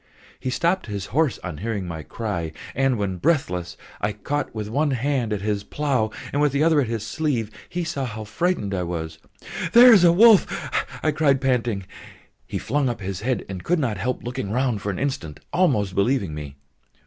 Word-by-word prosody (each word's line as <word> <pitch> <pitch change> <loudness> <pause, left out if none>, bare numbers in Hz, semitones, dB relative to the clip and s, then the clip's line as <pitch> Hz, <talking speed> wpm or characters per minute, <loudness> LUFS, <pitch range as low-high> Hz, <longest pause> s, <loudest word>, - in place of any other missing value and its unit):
He 130 - -3
stopped 170 +8 0
his 100 -3 -4
horse 150 -2 +2
on 85 -5 -5
hearing 105 -3 -3
my 80 -2 -5
cry, 85 -4 -4 0.2
and 135 -2 +2
when, 100 -3 -2
breathless, 90 - 0 0.2
I 105 0 0
caught 135 +7 -3
with 105 -1 -3
one 145 +7 +1
hand 130 -3 0
at 105 -2 -1
his 105 -1 -1
plough 130 -2 0 0.2
and 145 - +1
with 145 -2 +3
the 140 +2 +2
other 160 -2 +4
at 125 - -1
his 115 -2 -3
sleeve, 125 -7 -1 0.2
he 175 0 -2
saw 145 -4 -2
how 110 -2 -5
frightened 110 - -1
I 95 - -1
was. 80 -2 -4 0.5
"There 245 +1 +10
is 195 -5 +6
a 170 - +7
wolf!" 215 +3 +7 0.6
I 155 - +3
cried, 145 -3 +2
panting. 120 -7 0 0.6
He - - -3
flung 140 -2 0
up 120 - -4
his 95 0 -4
head, 125 -1 -1
and 95 -2 -6
could 175 - +2
not 120 -9 -1
help 125 +6 -2
looking 120 -5 -4
round 120 -2 0
for 105 - -3
an 95 - -2
instant, 130 - -3
almost 130 - +2
believing 100 - +1
me. 75 -2 -7
120 Hz, 195 wpm, -23 LUFS, 100-145 Hz, 0.6 s, There